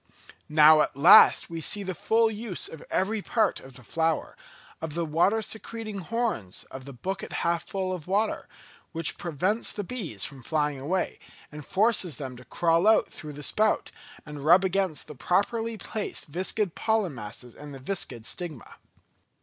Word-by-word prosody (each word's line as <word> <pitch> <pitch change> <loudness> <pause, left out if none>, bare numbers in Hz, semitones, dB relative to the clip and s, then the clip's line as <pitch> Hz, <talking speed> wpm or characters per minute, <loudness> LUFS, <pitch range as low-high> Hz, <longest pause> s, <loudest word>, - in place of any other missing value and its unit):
Now 155 0 +7
at 140 - -1
last 170 +9 +8
we 165 -1 -6
see 205 +6 +1
the 185 -1 -3
full 225 +5 +2
use 215 -3 -3
of 160 - -10
every 210 +3 0
part 225 +2 +1
of 130 -1 -14
the 125 - -11
flower, 165 +6 -1 0.5
of 160 -2 -5
the 170 -1 -1
water 180 +8 +2
secreting 220 -1 -5
horns 210 - -2
of 130 -1 -9
the 140 - -8
bucket 190 +10 -5
half 170 0 0
full 190 -1 -2
of 175 -4 -7
water, 205 +4 0 0.5
which 165 -2 0
prevents 180 +7 0
the 205 - -4
bees 180 - -3
from 140 -3 -8
flying 150 +1 -1
away, 175 +7 -2 0.3
and 150 0 -8
forces 190 - +2
them 130 -3 -6
to 125 - -14
crawl 165 - +2
out 220 - +4
through 150 -1 -8
the 145 +1 -8
spout, 215 +6 +1 0.3
and 150 -2 -8
rub 175 +5 +6
against 190 -4 0
the - - -10
properly 225 - 0
placed 215 0 -4
viscid 185 +4 -1
pollen 220 -7 0
masses 115 +1 -8
and 150 0 -10
the 135 - -8
viscid 130 - -3
stigma. 155 -3 -5
170 Hz, 170 wpm, -27 LUFS, 150-205 Hz, 0.5 s, last